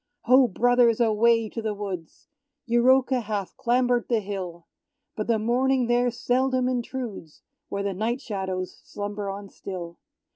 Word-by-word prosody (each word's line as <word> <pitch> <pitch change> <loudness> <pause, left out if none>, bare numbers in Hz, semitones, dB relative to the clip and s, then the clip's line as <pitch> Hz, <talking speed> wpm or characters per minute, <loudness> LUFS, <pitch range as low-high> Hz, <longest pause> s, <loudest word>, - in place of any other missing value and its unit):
Ho, 255 +2 +5
brothers, 240 +2 +3
away 230 0 +3
to 230 - -5
the 215 -1 -2
woods; 190 -6 -7 0.4
Euroka 255 +2 +4
hath 205 -3 -4
clambered 245 0 +1
the 235 -2 +3
hill; 185 -4 -6 0.5
But 215 - -3
the 230 -1 +3
morning 250 +3 +2
there 240 +1 +2
seldom 255 +2 +1
intrudes, 245 - -4 0.3
Where 200 - -2
the 200 -1 -1
night 225 +6 -1
shadows 190 -6 -4
slumber 205 0 -5
on 200 +1 -6
still. 175 -4 -7
230 Hz, 140 wpm, -25 LUFS, 200-245 Hz, 0.5 s, Ho